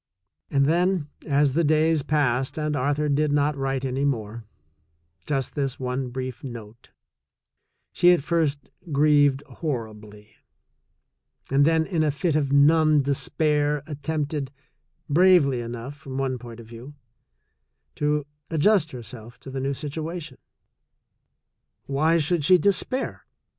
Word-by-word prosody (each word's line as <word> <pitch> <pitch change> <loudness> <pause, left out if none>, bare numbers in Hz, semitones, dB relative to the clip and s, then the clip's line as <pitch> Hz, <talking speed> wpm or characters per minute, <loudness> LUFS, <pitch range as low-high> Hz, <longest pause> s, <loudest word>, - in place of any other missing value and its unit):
And 140 -1 +2
then, 175 0 +1 0.2
as 145 -2 +2
the 170 +4 +2
days 155 0 +3
passed 135 -3 0
and 150 -1 -1
Arthur 145 +3 0
did 150 +1 +1
not 145 +1 +1
write 135 -1 -2
any 130 +1 -2
more 115 -5 -2 0.4
— 80 +2 -34
just 135 -4 -2
this 135 -3 -2
one 130 0 -3
brief 130 +3 -6
note 115 -3 -10 0.5
— - - -53
she 175 - +4
at 175 -6 +2
first 155 -4 -1 0.2
grieved 145 -1 +3
horribly, 110 -7 -7 1.1
and 140 +1 +4
then 160 0 +3
in 170 -3 -1
a 155 - +2
fit 150 +3 -1
of 140 -3 0
numb 150 +1 +4
despair 145 +1 0
attempted, 150 -2 -3 0.6
bravely 150 -6 +4
enough 120 +4 -7
from 135 -2 -8
one 130 -2 -1
point 120 -1 -10
of 115 - -11
view, 120 +6 -11 1.0
to 150 0 0 0.2
adjust 165 +1 +3
herself 120 0 -10
to 135 - -9
the 135 - -4
new 135 +1 -1
situation. 155 0 -6 1.5
Why 155 +4 +2
should 165 0 +1
she 185 +4 +6
despair? 200 - -1
140 Hz, 130 wpm, -24 LUFS, 130-155 Hz, 1.5 s, she